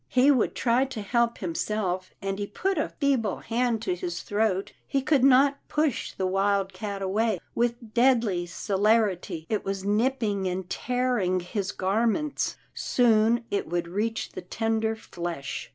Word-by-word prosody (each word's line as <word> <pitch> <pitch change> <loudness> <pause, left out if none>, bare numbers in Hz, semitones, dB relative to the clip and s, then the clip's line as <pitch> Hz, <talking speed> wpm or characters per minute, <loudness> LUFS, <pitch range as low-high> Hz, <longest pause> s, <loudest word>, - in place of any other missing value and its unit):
He 255 +3 +5
would 255 -5 +1
try 245 +2 +2
to 255 -6 -6
help 235 +2 +1
himself, 185 +1 -2
and 195 0 -2
he 205 - -2
put 375 - -1
a - - 0
feeble 260 - +1
hand 230 -1 -1
to 185 - 0
his 175 0 -4
throat. 205 -2 0
He 275 -1 0
could 285 -3 +3
not 275 +1 +5
push 300 -4 0
the 190 - -2
wildcat 195 +1 0
away. 210 +2 +1 0.2
With 235 -2 -1
deadly 235 -8 +3
celerity 200 -4 +1
it 215 - -1
was 195 -1 -3
nipping 210 -2 +1
and 185 0 -3
tearing 245 -7 0
his 190 +2 -3
gar 205 +5 +1
ments. 295 +5 -1 0.2
Soon 230 -1 +3
it 200 - -1
would 175 0 -1
reach 215 +6 -2
the - - -7
tender 225 +4 -1
flesh. 170 -9 -5
215 Hz, 150 wpm, -27 LUFS, 190-240 Hz, 0.2 s, He